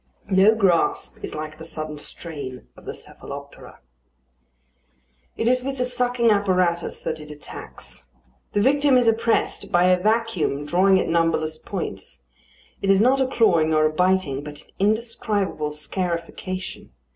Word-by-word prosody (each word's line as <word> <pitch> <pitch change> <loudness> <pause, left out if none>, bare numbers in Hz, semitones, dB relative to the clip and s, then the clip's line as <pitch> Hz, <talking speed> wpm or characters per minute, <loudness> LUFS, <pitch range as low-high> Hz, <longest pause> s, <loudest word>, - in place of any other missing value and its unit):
No 195 +4 +6
grasp 190 -6 +1
is - - -5
like 155 0 -6
the - - -8
sudden 155 -2 -6
strain 145 -5 -7
of - - -16
the - - -4
cephaloptera. 140 0 -10 1.6
It 225 - 0
is 255 +1 +2
with 275 +1 -3
the 250 - +1
sucking 245 -2 +1
apparatus 185 -4 +1
that 155 - -3
it 150 0 -11
attacks. 65 - -10 0.5
The 205 - +2
victim 280 0 +4
is 245 -2 +3
oppressed 225 0 +1
by 175 0 +4
a 180 0 +3
vacuum 215 -9 0
drawing 185 +4 +4
at - - -1
numberless 165 -2 +1
points: 95 - -6 0.6
it 195 - -1
is 195 -1 +5
not 260 +5 +4
a 260 - +2
clawing 170 -11 +3
or 155 0 +4
a 155 - +1
biting, 180 -5 +1
but 150 0 -8
an - - -22
indescribable 210 -6 0
scarification. 175 - -4
185 Hz, 145 wpm, -23 LUFS, 155-220 Hz, 1.6 s, No